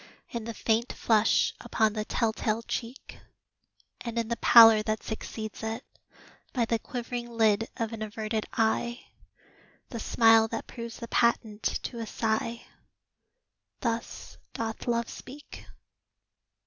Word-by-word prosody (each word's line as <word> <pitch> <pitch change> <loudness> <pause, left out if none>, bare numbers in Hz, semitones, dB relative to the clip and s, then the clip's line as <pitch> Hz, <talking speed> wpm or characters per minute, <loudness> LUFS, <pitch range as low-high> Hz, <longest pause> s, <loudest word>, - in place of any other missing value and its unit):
In 230 -2 -4
the 230 - -4
faint 230 +2 0
flush 220 -1 +3
upon 220 -2 +1
the 215 -1 -2
tell 225 -1 0
tale 220 +1 -1
cheek, 235 +3 -6 0.8
And 235 -1 -5
in 230 -1 -1
the 235 - 0
pallor 225 -2 +8
that 215 0 -2
succeeds 220 -1 -6
it; 225 +3 -4 0.7
by 240 -3 +1
The 230 0 0
quivering 240 0 -5
lid 225 -1 +2
of 230 0 -2
an 225 - -6
averted 215 0 -3
eye 235 +2 0 0.8
The 235 - -5
smile 225 0 +5
that 225 0 -5
proves 235 -2 -8
the 235 - -7
patent 230 -3 +1 0.2
to 235 - -5
a 225 - -4
sigh 225 +1 -2 1.2
Thus 235 -2 -4
doth 225 +1 -4
Love 235 -1 +1
speak. 285 +3 -11
230 Hz, 135 wpm, -28 LUFS, 220-235 Hz, 1.2 s, pallor